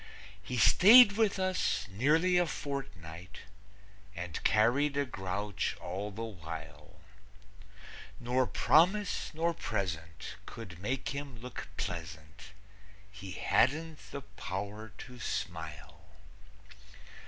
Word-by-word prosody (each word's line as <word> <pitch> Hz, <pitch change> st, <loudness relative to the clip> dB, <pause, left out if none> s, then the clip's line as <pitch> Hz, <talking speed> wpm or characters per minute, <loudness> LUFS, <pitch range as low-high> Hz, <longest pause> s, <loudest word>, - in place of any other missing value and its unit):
He 125 Hz, +6 st, -4 dB
stayed 215 Hz, -, +9 dB
with 205 Hz, -1 st, +1 dB
us 185 Hz, -1 st, 0 dB
nearly 160 Hz, -, +3 dB
a 175 Hz, -, +2 dB
fortnight 95 Hz, -, -6 dB, 0.7 s
And 85 Hz, -2 st, -5 dB
carried 135 Hz, +7 st, +3 dB
a 145 Hz, -, +2 dB
grouch 100 Hz, -3 st, -3 dB
all 95 Hz, +4 st, -4 dB
the 110 Hz, +3 st, -6 dB
while, 80 Hz, -6 st, -9 dB, 1.2 s
Nor 125 Hz, +1 st, +1 dB
promise 180 Hz, -, +3 dB
nor 170 Hz, +2 st, +1 dB
present 85 Hz, -, -4 dB
could 95 Hz, -7 st, -9 dB
make 125 Hz, +7 st, -2 dB
him 140 Hz, -3 st, -6 dB
look 125 Hz, +1 st, -7 dB
pleasant; 85 Hz, +3 st, -6 dB, 0.6 s
He 100 Hz, -2 st, -8 dB
hadn't 155 Hz, -, +1 dB
the 140 Hz, -, -6 dB
power 100 Hz, +1 st, -6 dB
to 125 Hz, -1 st, -10 dB
smile. 80 Hz, -9 st, -5 dB
110 Hz, 100 wpm, -32 LUFS, 90-145 Hz, 1.2 s, stayed